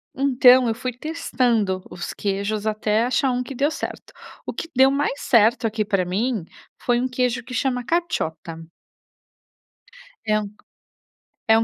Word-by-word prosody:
Então, 255 -2 +5
eu 225 - 0
fui 250 +2 -4
testando 240 - -1
os 175 0 -6
queijos, 205 +2 -2
até 215 +1 +1
achar 260 +1 +1
um 245 - -1
que 265 +1 -8
deu 285 +5 +1
certo. - - -6 0.3
O - - -4
que 330 - -6
deu 265 +1 +6
mais 280 0 -1
certo 230 -1 +3
aqui 220 -1 -1
pra 195 -3 +1
mim, 210 +2 -1 0.4
foi 240 -1 +1
um 255 - 0
queijo 250 0 -1
que 250 +1 -10
chama 250 -1 -1
caciotta. 165 - -2 1.7
É 215 0 +2 0.9
um 225 0 +2
240 Hz, 145 wpm, -22 LUFS, 215-260 Hz, 1.7 s, deu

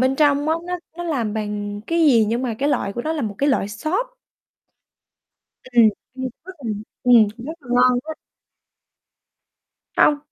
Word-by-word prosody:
bên 260 +1 +2
trong 290 0 +3
á, 320 - +3
nó 360 0 -3 0.2
nó 345 - -5
làm 240 -10 -1
bằng 205 -1 -4
cái 335 0 0
gì 250 -9 +5
nhưng 230 +4 -1
mà 235 -3 -2
cái 285 +2 +1
loại 235 -8 0
của 240 - -4
nó 315 - -1
là 305 - -2
một 210 -3 -3
cái 285 - +2
loại 230 -7 +1
xốp. 375 - -3 1.5
Ừm, 240 -3 +5 0.3
ăn 260 0 -3 0.2
rất 375 - -9
là 225 - -1 0.3
ừm, 235 -4 +6
rất 280 +7 -6
là 245 - -17
ngon 250 0 +4
á. 315 - -4 1.8
Hông. 295 -1 +5
255 Hz, 175 wpm, -21 LUFS, 225-305 Hz, 1.8 s, ừm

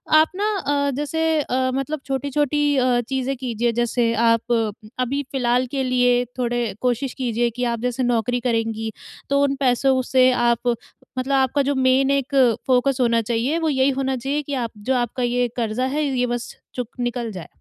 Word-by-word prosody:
आप 310 +1 +6
ना 405 +2 -1
अ, 285 -3 0
जैसे 295 +3 -2 0.2
अ, 260 -1 0
मतलब 275 +3 -2
छोटी-छोटी 285 +2 -1 0.2
अ, 250 -2 +3
चीज़ें 265 0 -1
कीजिए। 240 -2 -1
जैसे 240 -1 +1
आप 230 +1 +2 0.5
अभी 260 +3 0
फ़िलहाल 250 -1 +1
के 270 -2 -1
लिए 245 -1 +3 0.2
थोड़े 240 -2 -1
कोशिश 250 +1 0
कीजिए 240 -2 0
कि 250 - -1
आप 235 - -4
जैसे 250 +1 -1
नौकरी 245 0 +1
करेंगी, 225 -2 -1 0.4
तो 280 0 +3
उन 275 -1 +1
पैसों 260 0 +3
से 255 -1 +6
आप 240 -1 +1 0.5
मतलब 265 +2 -1
आपका 265 +1 +2
जो 280 +1 0
मेन 265 +1 +3
एक 280 0 -1 0.3
फ़ोकस 255 +1 +2
होना 235 -1 +3
चाहिए, 235 +7 0
वो 325 -1 0
यही 265 -1 +2
होना 265 0 0
चाहिए 275 +4 -2
कि 285 - -6
आप 230 - -6
जो 255 +6 -1
आपका 245 0 -1
ये 245 0 +1
कर्ज़ा 235 +2 -1
है, 290 +4 -1
ये 260 -3 0
बस 240 0 -4 0.2
चुक 245 -3 -4
निकल 240 -1 -2
जाए। 180 -5 -8
255 Hz, 180 wpm, -22 LUFS, 240-275 Hz, 0.5 s, आप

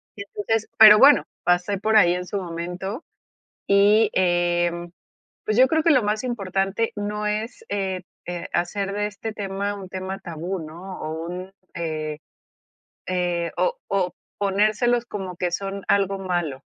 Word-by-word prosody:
Entonces 210 +2 -2
pero, 215 -1 +10
bueno, 280 +5 +7 0.2
pasé 180 +3 +1
por 220 +3 0
ahí 175 -4 +6
en 180 0 -3
su 200 - -4
momento 180 - -5 0.6
y, 205 +2 +5
eh, 175 -1 +2 0.7
pues, 215 - 0
yo 260 +1 +7
creo 320 +3 +2
que 335 - +5
lo 260 -7 +5
más 215 +3 -1
importante 195 -1 -1
no 210 +1 -3
es, 220 - -3
eh, 190 -2 -2 0.2
eh, 175 0 -5
hacer 195 +3 -1
de 205 +1 -1
este 210 +2 -6
tema 200 0 -3
un 195 -2 -8
tema 190 +1 -5
tabú, 175 +1 -5
¿no? 180 +4 -9
O, 160 +1 -4
un 180 +2 -6 0.2
eh, 155 -2 -3 0.9
eh, 175 -2 -1
o - - +1
o, 190 -2 0 0.3
ponérselos 215 +4 +2
como 190 -5 -6
que 180 -1 -1
son 195 +2 -4
algo 195 -1 +2
malo, 175 -8 -2
195 Hz, 150 wpm, -23 LUFS, 175-210 Hz, 0.9 s, pero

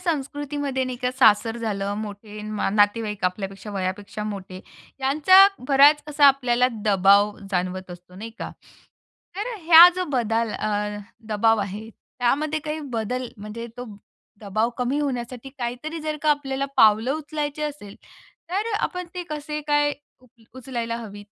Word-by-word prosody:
संस्कृतीमध्ये 290 -4 -2
नाही 255 -1 -5
का 250 - +1
सासर 225 0 +4
झालं 205 -3 -3
मोठे 210 0 -8 0.3
नातेवाईक 210 -1 +1
आपल्यापेक्षा 195 +2 -3
वयापेक्षा 200 +2 -4
मोठे 190 -3 -6 0.4
यांचा 310 +9 +6 0.2
बराच 285 +2 +6
असा 290 -1 +5
आपल्याला 250 -2 +3 0.2
दबाव 200 +1 +4
जाणवत 185 0 -2
असतो 180 +1 -12
नाही 220 +4 -8
का, - - -5 0.9
तर 455 +4 -3
ह्या 335 +1 +9
जो 365 - -1
बदल 230 -3 0
अ, 210 0 -2 0.3
दबाव 225 +1 +2
आहे 205 +3 -5
त्यामध्ये 295 +8 -2
काही 305 +1 -4
बदल 250 +3 -2
म्हणजे 215 +3 -7
तो 245 - -6 0.6
दबाव 215 +3 -1
कमी 250 +4 0
होण्यासाठी 255 -2 -4
काही 240 0 -3
तरी 320 +1 -4
जर 305 0 -3
का 305 - +3
आपल्याला 275 -2 -1
पावलं 220 +4 +5
उचलायची 300 -1 -4
असेल 285 -9 -6 0.6
तर 415 +5 -1
अ, - - +1
आपण 360 -1 -3
ते 360 - -4
कसे 300 0 -4
काय 290 0 +1 0.3
उप 255 -2 -23 0.3
उचलायला 235 -3 -4
हवीत? 205 -3 -9
240 Hz, 145 wpm, -23 LUFS, 210-290 Hz, 0.9 s, ह्या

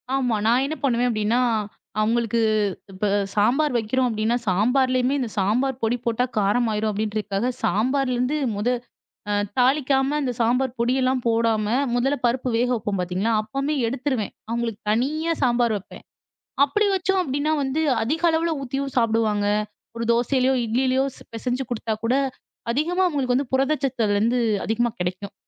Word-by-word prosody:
ஆமா. 250 -4 +1
நான் 245 +3 +4
என்ன 305 +3 -3
பண்ணுவேன்? 245 -2 +2
அப்பிடின்னா, 220 +2 +1 0.6
அவுங்களுக்கு 230 +1 +1 0.5
இப்ப 195 +2 -2 0.3
சாம்பார் 250 +7 +2
வைக்கிறோம் 250 +3 0
அப்பிடின்னா, 225 +1 0
சாம்பார்லயுமே 250 +6 +2
இந்த 245 -4 -2
சாம்பார் 245 +7 0
பொடி 225 +2 +1
போட்டா 235 +1 +1
காரம் 210 +4 +2
ஆயிரும் 215 +1 0
அப்பிடின்றதுக்காக 210 +2 -2
சாம்பார்லருந்து 250 +5 +1 0.2
முத 210 +4 -2 0.6
அ - - +1 0.2
தாளிக்காம 270 +2 +2
இந்த 260 -3 -1
சாம்பார் 245 +2 +1
பொடியெல்லாம் 255 +1 +1
போடாம 225 -1 +2 0.3
முதல்ல 270 +4 +1
பருப்பு 250 +1 0
வேக 245 +2 +2
வைப்போம் 210 -3 -2
பார்த்தீங்களா, 185 +5 -1
அப்பமே 275 +7 -2
எடுத்துருவேன். 255 -3 -2 0.2
அவுங்களுக்கு 230 -2 -2
தனியா 300 +9 0
சாம்பார் 240 -3 +2
வப்பேன். 195 - -12 0.6
அப்பிடி 410 +9 +2
வச்சோம் 385 +1 +1
அப்பிடின்னா 290 -1 -1
வந்து 270 +3 -1 0.2
அதிக 295 +9 -1
அளவுல 330 +1 +1
ஊத்தியும் 275 +1 -3
சாப்டுவாங்க. 220 -3 +2 0.5
ஒரு 230 0 -3
தோசையிலயோ! 255 +2 +2
இட்லிலயோ! 255 +3 +1 0.3
பிசைஞ்சு 250 +3 -2
கொடுத்தா 225 -2 -2
கூட 230 +2 +1 0.6
அதிகமா 340 +9 +1
அவுங்களுக்கு 270 -7 0
வந்து 265 0 -1
புரத 270 +3 +3
சத்து 260 -3 -1
அதுலருந்து 215 +5 +2 0.3
அதிகமா 235 +2 +1
கிடைக்கும். 185 +3 -4
245 Hz, 140 wpm, -23 LUFS, 225-270 Hz, 0.6 s, நான்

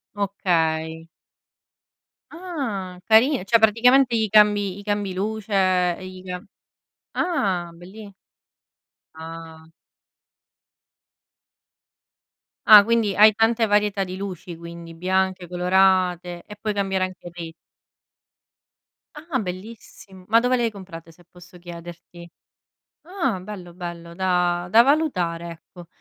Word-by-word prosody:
Okay. 165 -5 -1 1.3
Ah, 260 - -5
carina, 230 +2 +4
cioè 230 +4 +3
praticamente 240 +3 +4
gli 220 -2 0
cambi 205 -2 +3
gli 205 - -10
cambi 205 -2 -2
luce, 190 -3 0
gli 185 0 -10
cam 180 +3 -7 0.7
ah, 190 - -1
belli. 195 +5 -12 1.0
Ah. 160 0 -11 3.0
Ah, 210 -2 +10
quindi 225 -2 0
hai 215 +1 +7
tante 225 +2 +2
varietà 205 -1 +1
di 185 -1 -6
luci 185 -3 -7
quindi, 170 0 -10
bianche, 185 +1 -1
colorate 180 -1 +1
e 210 - -11
puoi 215 -1 -2
cambiare 195 -2 0
anche 185 -1 -10
lì. 170 -2 -7 1.6
Ah, 300 -2 -4
bellissimo! 190 -1 -9
Ma 225 +2 +5
dove 250 +2 +1
le 240 - 0
hai 230 - 0
comprate, 180 -5 -11
se 175 +2 -22
posso 180 0 -16
chiederti? 175 0 -11 0.7
Ah, 350 - -2
bello, 185 -3 -10
bello 170 -1 -8
da 180 -1 0
da 225 +6 +6
valutare, 180 - 0
ecco. 170 +1 -13
190 Hz, 110 wpm, -22 LUFS, 175-215 Hz, 3.0 s, Ah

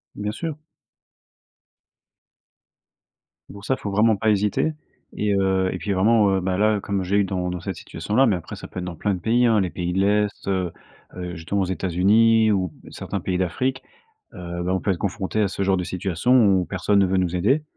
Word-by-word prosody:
Bien 105 0 -3
sûr. 160 +5 -5 3.0
Pour 100 +1 -11
ça, 130 - +1
il - - -18
faut 100 - -4
vraiment 110 +2 +3
pas 110 +2 0
hésiter 105 +9 +1 0.4
et 105 -1 0
heu 95 -1 +1
et - - -4
puis 100 +3 -4
vraiment, 105 +2 +4
heu, - - +1
bah 90 0 -1
là, 110 +1 +3
heu, - - -3
comme 100 -2 -2
j'ai 100 +3 0
eu 100 - +4
dans 90 -1 -2
dans 90 0 -4
cette 95 +2 -5
situation-là, 120 +10 0
mais 105 -7 +2
après 85 - -8
ça - - -9
peut 90 - -7
être 90 - -5
dans 90 -2 -6
plein 105 +5 -1
de 90 - -4
pays, 120 +6 +2
hein, 110 -3 +4
les 95 - 0
pays 90 0 -3
de 95 - 0
l'Est, 105 +1 0
heu 95 -3 -1 0.4
heu, 90 -1 -6
justement 85 +5 -2
aux 95 - +1
États-Unis 105 +5 +3
ou 95 -4 0 0.2
certains - - -5
pays 90 -1 -2
d'Afrique, 130 +9 -1 0.5
heu, 85 0 -6
bah 90 - 0
on 95 - 0
peut 100 - -1
être 90 - 0
confronté 100 +2 -2
à 100 - +2
ce 100 - -4
genre 95 0 +2
de 90 - -2
situation, 95 +7 0 0.3
où - - -2
personne 100 +2 +1
ne 95 - +4
veut 95 - 0
nous 90 -1 0
aider. 130 - +2
95 Hz, 220 wpm, -23 LUFS, 90-105 Hz, 3.0 s, vraiment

